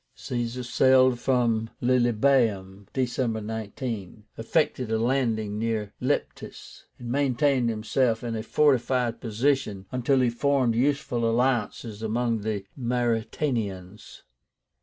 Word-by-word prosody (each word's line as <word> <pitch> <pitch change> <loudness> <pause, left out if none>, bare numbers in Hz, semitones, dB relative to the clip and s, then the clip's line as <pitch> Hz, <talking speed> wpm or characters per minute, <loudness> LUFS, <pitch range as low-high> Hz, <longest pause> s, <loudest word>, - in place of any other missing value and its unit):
Caesar 120 0 -4
sailed 130 0 +4
from 120 -4 +1
Lilybaeum 120 -6 +1
(December 125 -3 -1
19), 110 -1 -5
effected 125 0 0
a 110 - +2
landing 110 -4 0
near 110 -2 -2
Leptis, 140 +3 -4
and 120 -1 -6
maintained 135 -2 +2
himself 115 +1 0
in 115 -1 -3
a 110 - -3
fortified 125 -2 +1
position 115 -4 -1
until 130 +1 +1
he 125 - +3
formed 130 -1 +1
useful 125 -2 0
alliances 115 -3 -1
among 115 +1 0
the 105 -2 -3
Mauretanians. 115 -5 -2
120 Hz, 105 wpm, -26 LUFS, 110-130 Hz, -, sailed